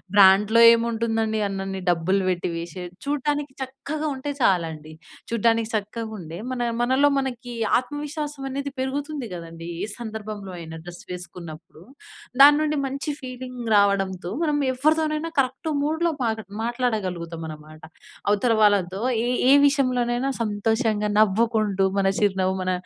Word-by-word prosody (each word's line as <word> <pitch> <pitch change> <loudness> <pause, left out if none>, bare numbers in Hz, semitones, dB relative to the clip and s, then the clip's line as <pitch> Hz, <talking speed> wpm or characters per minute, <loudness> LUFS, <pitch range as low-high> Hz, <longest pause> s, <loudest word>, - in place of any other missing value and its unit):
బ్రాండ్‍లో 205 +3 +6
ఏముంటుందండి 225 -1 0
అన్నన్ని 195 -1 -4
డబ్బులు 185 +3 +1
పెట్టి 175 -1 -2
వేసి 170 +2 -6 0.2
చూడటానికి 290 -1 -1
చక్కగా 295 +4 -4
ఉంటే 285 +2 -4
చాలండి. 160 -6 0 0.4
చూడ్డానికి 230 0 +1
చక్కగా 220 +2 -3
ఉండే 165 0 -8
మన 250 -1 -3 0.2
మనలో 265 +4 +3
మనకి 245 -2 -5 0.2
ఆత్మవిశ్వాసం 295 +1 -5
అనేది 280 +1 -4
పెరుగుతుంది 285 0 -3
కదండీ. 165 0 -8 0.2
ఈ - - -8
సందర్భంలో 215 -3 -6
అయినా 160 -1 -8
డ్రెస్ 175 0 -10
వేసుకున్నప్పుడు, 175 -2 -9 0.7
దాని 290 +1 +10
నుండి 305 0 0
మంచి 275 +3 -4
ఫీలింగ్ 255 -1 -7
రావడంతో 195 -3 +2
మనం 300 -3 +1 0.2
ఎవరితోనైనా 310 +3 +1
కరెక్ట్ 265 +3 -1
మూడ్‌లో 320 +3 +1
మాగా 220 -1 -1 0.2
మాట్లాడగలుగుతాం 190 -9 -2
అనమాట. 155 0 -11 0.5
అవతల 215 +3 +3
వాళ్ళతో 195 -2 +3 0.3
ఏ - - 0 0.2
ఏ - - +7
విషయంలోనైనా 255 -2 +1
సంతోషంగా, 215 0 0
నవ్వుకుంటూ, 215 -1 +2
మన 195 -1 +2
చిరునవ్వు 190 -2 +1
మన 185 0 0
225 Hz, 125 wpm, -24 LUFS, 190-265 Hz, 0.7 s, దాని